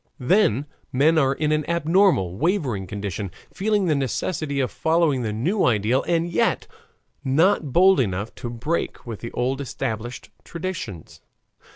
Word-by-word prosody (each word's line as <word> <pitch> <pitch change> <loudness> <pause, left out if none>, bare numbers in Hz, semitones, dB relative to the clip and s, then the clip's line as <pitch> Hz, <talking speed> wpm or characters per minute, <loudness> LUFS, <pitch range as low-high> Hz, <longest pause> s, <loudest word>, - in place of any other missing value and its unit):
Then 140 - +2 0.3
men 155 +5 +4
are 135 -2 +3
in 150 +1 0
an 155 0 +1
abnormal, 170 - +2
wavering 135 - -1
condition, 100 0 -4 0.2
feeling 205 0 +1
the 160 - +2
necessity 140 +2 -2
of 130 - 0
following 160 0 +1
the 110 -3 -2
new 165 - 0
ideal, 115 +2 +2
and 170 -1 +1
yet 170 - +1 0.6
not 155 +2 +2
bold 185 +5 +5
enough 100 -2 -1
to 120 - -5
break 125 +8 -3
with 115 -4 -6
the 115 - -7
old 130 +3 -1
established 120 -2 -5
traditions. 165 - -6
135 Hz, 145 wpm, -23 LUFS, 115-170 Hz, 0.6 s, bold